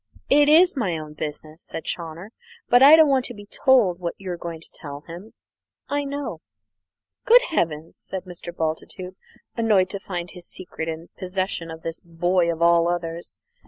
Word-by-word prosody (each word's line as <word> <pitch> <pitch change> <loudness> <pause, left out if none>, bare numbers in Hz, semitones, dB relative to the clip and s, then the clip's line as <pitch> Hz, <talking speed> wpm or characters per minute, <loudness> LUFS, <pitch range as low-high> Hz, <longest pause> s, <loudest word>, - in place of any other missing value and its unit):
"It 290 +1 +6
is 350 +4 +6
my 195 -11 -1
own 155 -1 -8
business," 155 +1 -6
said 160 - -6
Chawner; 170 +4 -5 0.4
"but 245 +1 +5
I 285 +3 +10
don't 320 -1 +6
want 270 -2 +3
to 245 - -6
be 205 0 -11
told 210 -5 +3
what 170 -1 -4
you're 185 -2 -5
going 170 -1 -7
to 165 - -17
tell 145 -2 -8
him. 175 +7 -11 0.5
I 285 0 -1
know." 280 0 -5 0.8
"Good - - +7
heavens!" 160 - -2
said 190 -1 -6
Mr. 175 -1 -8
Bultitude, 170 +3 -4 0.4
annoyed 210 -5 +2
to 200 - -4
find 175 -3 -5
his 180 -1 -10
secret 165 -3 -6
in 165 +1 -6
possession 185 -2 -3
of 160 0 -9
this 165 0 -4
boy 170 +1 +1
of 165 0 -2
all 170 0 +5
others. 170 -1 -4
175 Hz, 175 wpm, -23 LUFS, 165-220 Hz, 0.8 s, I